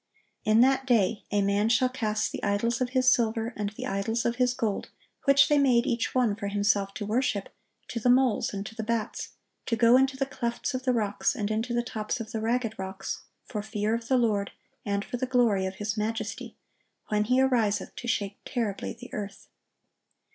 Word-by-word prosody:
"In 215 +2 +5
that 265 +1 +3
day 225 -3 +2
a 205 -1 +1
man 200 +2 +2
shall 255 +2 +4
cast 220 -4 -1
the - - -6
idols 225 +4 0
of 250 - +1
his 255 0 +4
silver, 230 0 0
and 205 -1 -2
the 205 - -7
idols 225 +4 -1
of 235 0 0
his 250 -1 +2
gold, 215 -5 -2 0.4
which 280 0 +6
they 295 -1 +4
made 250 -4 +4
each 245 -1 -1
one 240 -5 +3
for 205 -1 -4
himself 200 -1 +1
to 210 - -4
worship, 215 -2 0 0.4
to 235 - -3
the 245 - +1
moles 255 -2 +3
and 200 0 -4
to 220 - -8
the 220 - -5
bats; 225 0 -3 0.3
to 230 - +1
go 230 +2 +6
into 265 0 +2
the 270 - +1
clefts 240 0 -3
of 255 0 -4
the 255 - +3
rocks, 210 -4 0
and 210 0 -2
into 225 +3 -1
the 240 0 +1
tops 215 -1 -3
of 220 -1 -6
the 220 - -3
ragged 225 -1 -1
rocks, 190 0 -5 0.2
for 210 - -4
fear 215 0 -2
of 230 0 -3
the 260 - +3
Lord, 210 -4 +1 0.3
and 200 0 -1
for 245 - -4
the 255 +1 -2
glory 230 -7 +2
of 190 - -6
His 210 +1 -3
majesty, 220 +1 -4 0.5
when 210 0 +1
He 250 +3 +3
ariseth 225 -7 +1
to 240 - -6
shake 200 -3 -1
terribly 215 -5 -3
the - - -11
earth." 200 -1 -6
225 Hz, 205 wpm, -27 LUFS, 205-250 Hz, 0.5 s, which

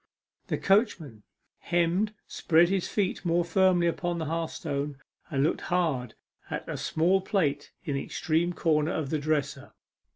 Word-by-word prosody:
The - - -1
coachman 190 - +1 0.4
hemmed, 175 +5 +1
spread 170 +1 +3
his 190 -2 0
feet 200 -3 -1
more 170 -1 +1
firmly 180 0 +3
upon 175 +1 -1
the 160 - -3
hearthstone, 150 -3 -3 0.3
and 135 -2 +1
looked 155 - +1
hard 150 -10 0 0.3
at - - -4
a - - -4
small 180 +4 +1
plate 150 -8 -1
in 150 - -2
the 135 - -1
extreme 165 +2 0
corner 160 -1 +1
of 150 -4 -3
the 155 - 0
dresser. 145 -2 -2
165 Hz, 150 wpm, -28 LUFS, 150-175 Hz, 0.4 s, spread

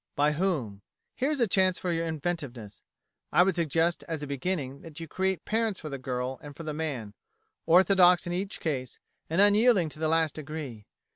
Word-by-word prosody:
By 150 +1 +3
whom? 150 - -1 0.3
Here 265 +3 -1
is 300 -2 -1
a 235 - +4
chance 185 -1 +2
for 180 - -2
your 165 0 -1
inventiveness. 145 - -4 0.5
I 175 - +6
would 190 +1 +2
suggest 165 +1 0
as 160 -3 -4
a - - -2
beginning 140 -1 -3
that 160 -1 -10
you 165 - -6
create 190 +1 -1
parents 220 -2 0
for 155 - -7
the 140 -1 -5
girl 125 0 -3
and 145 -1 -10
for 165 - -8
the 155 -1 -4
man 140 -10 -4 0.5
orthodox 180 0 +6
in 175 - -3
each 195 +3 -3
case, 130 -6 -3 0.3
and 165 +3 0
unyielding 205 -3 +5
to 155 - -7
the 160 - 0
last 160 -1 +2
degree. 145 -8 -7
160 Hz, 195 wpm, -28 LUFS, 140-185 Hz, 0.5 s, I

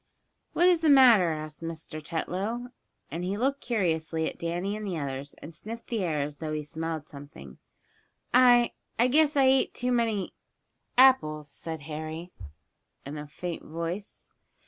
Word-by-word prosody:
"What 350 - +3
is 355 -2 +5
the 320 -1 +2
matter?" 245 -10 +7
asked 155 -1 -5
Mr. 165 -1 -6
Tetlow, 200 +10 -3 0.4
and 170 +4 -4
he 190 +3 -2
looked 275 +4 0
curiously 165 -8 0
at - - -7
Danny 175 +4 -2
and 215 - -6
the 190 -5 -3
others, 140 -1 -5
and 160 - -9
sniffed 225 +8 -8
the 225 -5 -1
air 155 -4 0
as 145 +1 -4
though 155 0 -4
he 150 0 -2
smelled 160 0 -4
something. 140 - -12 0.7
"I 245 -1 +6 0.3
I 235 - +4
guess 295 +3 +3
I 275 - +5
ate 265 0 +3
too 250 0 -1
many 225 -5 0 0.6
apples," 155 - +4
said 160 0 -6
Harry, 155 +3 -6 0.7
in 140 +2 -6
a 150 - -7
faint 170 +4 -6
voice. 170 +6 -6
170 Hz, 160 wpm, -28 LUFS, 155-235 Hz, 0.7 s, matter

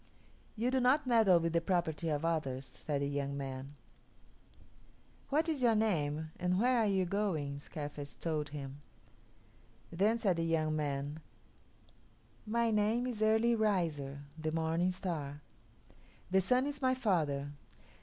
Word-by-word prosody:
"You 235 +3 0
do 265 - +2
not 265 +4 +3
meddle 220 -8 +5
with 165 0 -1
the 170 - +3
property 165 -2 0
of 150 +1 -1
others," 140 -5 -1
said 140 +2 -3
the - - 0
young 140 0 -2
man. 135 +1 -6 1.5
"What 310 +4 +2
is 310 -5 -1
your 235 -3 +4
name, 160 -8 0
and 180 +1 +1
where 250 +2 +3
are 220 - +3
you 190 -2 +2
going?" 170 -8 -1
Scarface 145 -1 -7
told 155 -3 -2
him. 140 -1 -7 1.1
Then 205 +7 +2
said 195 -6 +1
the 165 - 0
young 160 -2 +1
man, 145 0 -2 1.3
"My 230 +1 +1
name 215 +3 +2
is 240 -4 -4
Early 220 +2 +4
Riser 165 -11 0 0.2
(the 155 0 -2
morning 165 +2 +1
star). 155 -6 -4 0.9
The 190 0 +4
Sun 250 +7 +2
is 290 0 -4
my 260 -1 +3
father. 150 - 0
170 Hz, 145 wpm, -33 LUFS, 145-220 Hz, 1.5 s, meddle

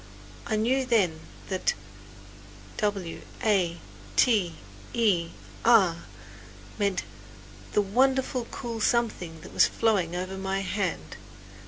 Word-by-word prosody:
I 220 - 0
knew 245 +5 +2
then 200 -11 +2 0.3
that 185 -1 0 1.0
"w 200 -5 -2 0.2
a 185 -6 +2 0.4
t 200 -9 +3 0.4
e 190 -8 +2 0.3
r" 190 -8 +5 0.8
meant 200 -3 +1 0.7
the 210 - +4
wonderful 255 +3 +1
cool 230 -3 -5
something 210 -10 0
that - - -11
was - - +6
flowing 195 -7 +1
over 185 +1 -4
my 195 0 -1
hand. 195 -1 -3
200 Hz, 105 wpm, -27 LUFS, 180-230 Hz, 1.0 s, was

